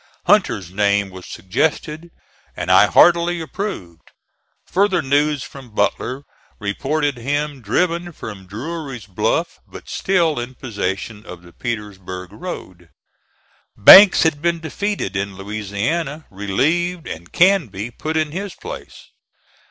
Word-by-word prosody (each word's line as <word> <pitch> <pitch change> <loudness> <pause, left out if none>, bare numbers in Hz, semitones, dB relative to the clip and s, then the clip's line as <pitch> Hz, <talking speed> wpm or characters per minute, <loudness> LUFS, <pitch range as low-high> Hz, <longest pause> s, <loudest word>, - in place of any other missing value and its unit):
Hunter's 140 - +2
name 100 0 +1
was 95 -1 -11
suggested, 155 - -2 0.5
and - - -1
I - - +7
heartily 175 0 +4
approved. 160 - -6 0.6
Further 190 -3 +1
news 145 0 +1
from 125 -6 -12
Butler 125 +6 -1 0.4
reported 140 +7 -1
him 145 +3 -2
driven 170 - 0
from 100 - -9
Drury's 135 - -6
Bluff, 95 -3 -1
but - - -12
still 170 -7 +1
in 120 +2 -6
possession 105 -2 -4
of 90 -5 -11
the 85 -1 -16
Petersburg 95 -6 -6
road. 95 - -8 0.9
Banks 190 - +10
had 155 -3 +1
been 170 0 +1
defeated 160 - -3
in 100 0 -2
Louisiana, 110 - -3
relieved, 155 - 0
and 85 +2 -8
Canby 130 - +2
put 155 +5 -3
in 155 -1 0
his 195 +3 -5
place. 485 - -9
135 Hz, 120 wpm, -20 LUFS, 100-170 Hz, 0.9 s, Banks